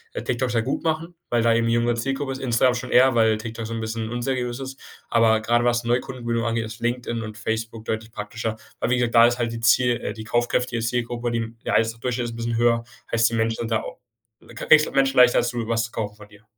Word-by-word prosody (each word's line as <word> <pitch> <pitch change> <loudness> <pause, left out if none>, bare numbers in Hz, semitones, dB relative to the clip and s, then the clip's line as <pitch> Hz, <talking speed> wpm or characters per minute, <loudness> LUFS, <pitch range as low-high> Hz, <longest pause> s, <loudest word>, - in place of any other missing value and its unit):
TikTok 125 0 -1
sehr 115 -2 0
gut 130 - -2
machen, 165 +2 -1 0.2
weil 120 -1 +1
da 115 - +4
eben 115 0 +1
jüngere 120 +1 +2
Zielgruppe 135 +3 -2
ist. 130 - -5
Instagram 125 0 +2
schon 125 +1 -5
eher, 130 +1 +6
weil 110 -2 +3
TikTok 115 0 -6
so 115 - -5
'n 115 - -3
bisschen 110 0 -4
unseriös 120 0 -2
ist. 135 0 -7 0.3
Aber 115 -1 +4
grade 120 +2 +1
was 120 0 +2
Neukundengewinnung 120 -1 -1
angeht, 115 -1 -1
ist 115 +1 -9
LinkedIn 120 -1 -2
und 110 -1 -7
Facebook 110 0 -4
deutlich 110 0 -4
praktischer. 110 +1 -4 0.2
Aber - - -1
wie 125 - +3
gesagt, 120 -1 0
da 115 0 +8
ist 120 +1 0
halt 120 -1 -1
die 115 - -5
Ziel 120 +1 +3
äh - - -3
die 110 -1 -8
kaufkräftige 120 +1 0
Zielgruppe, 120 +1 -2
die 115 -1 -3
der - - 0
Einkommensdurchschnitt 115 +2 0
ist 115 - -5
'n - - -9
bisschen 115 0 -2
höher, 115 0 +3 0.3
heißt 115 0 +3
die 115 - -3
Menschen 115 0 0
sind 115 0 -4
da 110 - +1
auch - - -9 0.4
du - - -20
kriegst 155 +5 +5
halt - - -9
Menschen 135 -1 +2
leichter 125 -1 +7
dazu, 120 -2 -2
was 115 -1 +1
zu 115 - -11
kaufen 105 -2 -4
von 105 -1 -14
dir. 105 +1 -19
115 Hz, 245 wpm, -23 LUFS, 115-120 Hz, 0.4 s, da